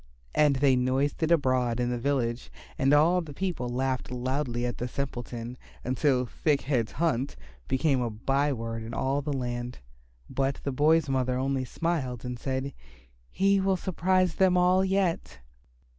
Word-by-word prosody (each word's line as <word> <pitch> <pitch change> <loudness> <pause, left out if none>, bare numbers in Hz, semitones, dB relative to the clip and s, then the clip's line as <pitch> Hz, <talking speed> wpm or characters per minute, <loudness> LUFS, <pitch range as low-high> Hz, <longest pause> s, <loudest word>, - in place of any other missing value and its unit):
And 150 -2 +4
they 135 -1 +4
noised 130 +4 0
it 160 - +2
abroad 130 -7 +2
in 120 0 0
the 120 - -2
village 120 -2 -1 0.3
and 135 +1 +2
all 165 +5 +5
the 150 -4 -9
people 175 -10 -2
laughed 130 +1 -1
loudly 125 -1 -2
at 120 - -3
the 125 - -2
simpleton, 125 -2 -5 0.2
until 130 0 +1
"Thick 145 +3 0
head's 125 -5 -1
hunt" 145 -6 0 0.3
became 135 -1 +2
a 120 - -1
by 135 +7 0
word 115 -2 -4
in 115 +1 -6
all 135 +2 0
the 145 +1 -3
land. 120 -2 -3 0.5
But 135 0 -1
the 140 - -1
boy's 150 +3 +3
mother 130 -2 0
only 135 0 -1
smiled 130 -5 -2
and 125 -1 -5
said, 130 +1 -3 0.6
"He 195 +1 +2
will 190 0 +2
surprise 185 0 +1
them 185 0 +3
all 180 +1 +4
yet." 185 - 0
135 Hz, 160 wpm, -28 LUFS, 125-155 Hz, 0.6 s, all